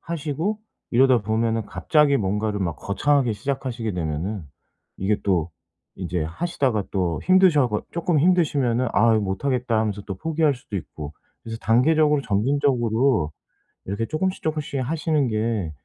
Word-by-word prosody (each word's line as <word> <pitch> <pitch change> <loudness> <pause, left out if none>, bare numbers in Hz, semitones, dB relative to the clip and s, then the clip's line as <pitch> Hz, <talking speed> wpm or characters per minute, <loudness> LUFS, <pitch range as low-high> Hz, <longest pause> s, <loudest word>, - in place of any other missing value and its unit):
하시고 165 +6 -3 0.3
이러다 130 +1 +5
보면은 110 +1 0
갑자기 140 - +2
뭔가를 105 0 -1
막 85 -5 -2
거창하게 130 - +1
시작하시게 125 -1 -3
되면은 90 +4 -3 0.5
이게 100 +2 0
또 90 -4 0 0.5
인제 90 -2 -2
하시다가 125 - -1
또 90 -4 -1
힘드셔 185 -8 +5
가 105 -2 -2
쪼끔 170 -1 0
힘드시면은 140 -8 +2
"아 115 +2 +4
못하겠다." 115 +4 -1
하면서 105 -2 -1
또 95 - -4
포기할 160 - +1
수도 125 -4 -12
있고. 75 -4 -7 0.3
그래서 115 0 -6
단계적으로 150 +5 +3
점진적으로 120 - +1 0.5
이렇게 100 +4 -2
쪼금씩 185 +4 -2
쪼금씩 150 -3 -2
하시는 155 +1 0
게 110 -6 -1
120 Hz, 345 characters per minute, -23 LUFS, 100-145 Hz, 0.5 s, 이러다